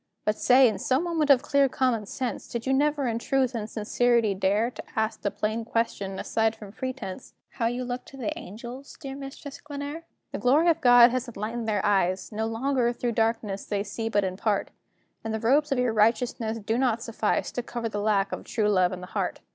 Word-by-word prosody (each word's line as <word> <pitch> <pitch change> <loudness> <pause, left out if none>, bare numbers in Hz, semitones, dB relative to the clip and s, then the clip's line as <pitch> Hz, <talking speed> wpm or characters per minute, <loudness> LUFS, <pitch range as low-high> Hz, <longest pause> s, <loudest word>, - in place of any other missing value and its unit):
But 210 - +2
say, 255 +3 +6
in 210 -4 -1
some 260 - +1
moment 330 -4 0
of 275 -1 +6
clear 280 -2 +3
common 245 -6 0
sense, 255 +2 -4
Did 235 -1 -5
you 265 - +1
never 290 +1 +2
in 230 -1 -1
truth 265 0 +1
and 220 -2 -4
sincerity 230 0 +2
dare 205 +5 +1
To - - -9
ask 220 -1 -1
the 200 - 0
plain 220 +3 -2
question, 210 -4 -2
aside 220 +2 0
from 210 -3 -11
pretence, 255 -3 -6 0.2
How 230 -3 -1
you 245 +2 -2
looked 245 0 -5
to 270 - -12
the 305 +4 -3
angels, 245 - -9
dear 275 -4 -6
Mistress 275 +1 -9
Glenare? 290 +2 -6 0.3
The - - -4
glory 295 +7 +4
of 330 0 +2
God 245 -1 +8
has 255 0 -2
enlightened 225 +1 -4
their 210 -2 0
eyes: 190 -1 +1
No 220 +1 -2
longer, 240 +1 +1
through 240 0 -2
darkness, 225 -3 -1
they 200 -1 -1
see 225 +2 -4
but 205 -2 +2
in 185 -1 -3
part, 205 -1 0 0.5
And 220 0 -2
the - - -2
robes 280 +6 +2
of 270 - +2
your 250 -2 +1
righteousness 225 +1 +1
do 225 +2 -1
not 235 -3 +1
suffice 225 -2 -1
To 245 - -3
cover 235 -1 -4
the 205 -2 -3
lack 205 -1 +1
of - - -5
true 215 -3 0
love 185 -3 +3
in 185 -1 -6
the - - -6
heart. - - -2
230 Hz, 215 wpm, -26 LUFS, 215-260 Hz, 0.5 s, God